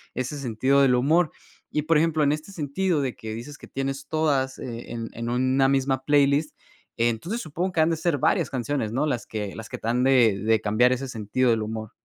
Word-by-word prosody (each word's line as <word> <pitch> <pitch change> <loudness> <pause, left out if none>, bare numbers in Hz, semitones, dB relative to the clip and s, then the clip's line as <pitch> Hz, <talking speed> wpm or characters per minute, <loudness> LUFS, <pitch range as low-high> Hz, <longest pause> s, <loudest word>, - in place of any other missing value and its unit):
ese 130 +4 -3
sentido 130 +2 +2
del 130 -2 +4
humor. 155 +6 +3 0.4
Y, 150 - 0
por 160 -1 +3
ejemplo, 160 -2 +2
en 145 - +3
este 155 +5 -4
sentido 165 0 -1
de 130 -3 -2
que 110 - -7
dices 145 +6 -9
que - - -12
tienes 135 +1 -4
todas 140 -4 0
e 120 -2 -7
en 115 -1 -5
en 115 +1 -4
una 130 +2 +2
misma 135 -1 +1
playlist, 145 +1 +2 0.4
entonces 120 - -1
supongo 175 +3 -3
que 160 - +2
han 160 +1 +3
de 165 - 0
ser 160 -2 0
varias - - +1
canciones, 130 -3 -2
¿no? 130 +6 0
Las 125 -6 -2
que 105 -3 -5
las 110 0 -8
que - - -5
te 115 - -7
han 125 +2 +1
de 120 -7 +4
de 110 +2 +2
cambiar 110 +4 +3
ese 130 +1 -4
sentido 120 +2 0
del 115 -1 +1
humor. 110 0 -5
135 Hz, 220 wpm, -25 LUFS, 115-150 Hz, 0.4 s, del